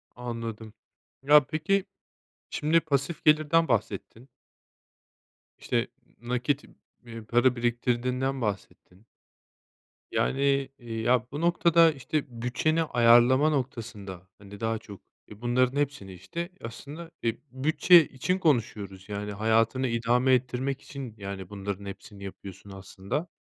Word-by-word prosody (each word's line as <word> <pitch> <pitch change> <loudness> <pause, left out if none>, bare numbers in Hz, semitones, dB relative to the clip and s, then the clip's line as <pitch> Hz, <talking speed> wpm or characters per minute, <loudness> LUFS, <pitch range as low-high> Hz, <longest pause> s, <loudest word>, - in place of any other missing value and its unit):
Anladım. 115 -3 -6 0.5
Ya 145 +1 +7
peki, 175 +5 0 0.6
şimdi 160 +3 +2
pasif 150 0 -2
gelirden 155 +2 +4
bahsettin 115 +3 -2 1.3
işte, - - -1 0.3
nakit, 125 +4 -1 0.4
eee, 115 -1 -8
para 120 +3 +3
biriktirdiğinden 125 +2 -1
bahsettin 100 -1 -5 1.1
yani, 140 0 +1
eee, 115 -2 -6
ya, 125 +1 +2
bu 145 +3 -4
noktada, 170 -1 +5
işte, 145 +1 -2
bütçeni 125 +7 0
ayarlama 120 +2 +5
noktasında 110 - -4
hani 100 0 -12
daha 115 0 -1
çok, 105 -3 -12 0.3
e, 105 +2 -12
bunların 125 +2 +1
hepsini, 135 -10 -3
işte, 170 - -6
aslında, 145 +8 -9
e, 115 - +1 0.2
bütçe 155 +5 +5
için 180 +8 -2
konuşuyoruz. 105 - -1
Yani, 105 0 -4
hayatını 115 +5 +2
idame 120 +3 +2
ettirmek 130 +2 -1
için, 135 -6 -8
yani, 100 -2 -7
bunların 100 0 -5
hepsini 100 0 -10
yapıyorsun 95 0 -10
aslında. 95 - -5
125 Hz, 115 wpm, -27 LUFS, 110-145 Hz, 1.3 s, Ya